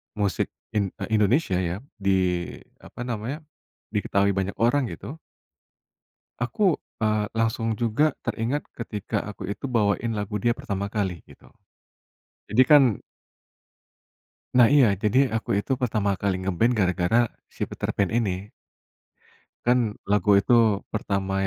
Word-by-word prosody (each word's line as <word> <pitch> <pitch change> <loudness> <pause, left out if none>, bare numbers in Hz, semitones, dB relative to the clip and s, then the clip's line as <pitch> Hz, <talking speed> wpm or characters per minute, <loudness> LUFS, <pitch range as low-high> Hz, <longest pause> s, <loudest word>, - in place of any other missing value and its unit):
musik 100 -2 0 0.2
in 105 -2 +1 0.2
eh, - - -5
Indonesia 105 - +2
ya, 90 0 -2 0.2
di, 95 -3 +1 0.3
apa 120 - -9
namanya, 120 +6 -4 0.5
diketahui 100 -1 +1
banyak 95 0 -2
orang 125 +3 +2
gitu. 155 +7 -8 1.2
Aku, 180 - +2 0.2
eee, 110 -1 +1
langsung 115 0 0
juga 130 +6 +2
teringat 120 +6 -2
ketika, 105 -4 -3
aku 100 -2 -7
itu 100 - -6
bawain 115 -2 +1
lagu 105 0 -3
dia 120 +4 +2
pertama 100 -7 -4
kali, 95 -6 -2
gitu. - - -18 1.0
Jadi 125 +5 +6
kan 145 -2 +8 1.7
nah 125 -2 +7
iya, 140 -4 +7 0.2
jadi 105 +4 +3 0.2
aku 115 - -3
itu 105 - -2
pertama 105 -4 +1
kali 100 -2 0
nge-band 95 +6 +1
gara-gara 90 +2 +2 0.4
si - - -5
Peterpan 100 -3 -1
ini. 100 -2 -2 1.1
Kan 125 +1 +4 0.3
lagu 105 0 +3
itu 100 - +1 0.4
pertama 100 -2 -2
105 Hz, 125 wpm, -25 LUFS, 100-120 Hz, 1.7 s, kan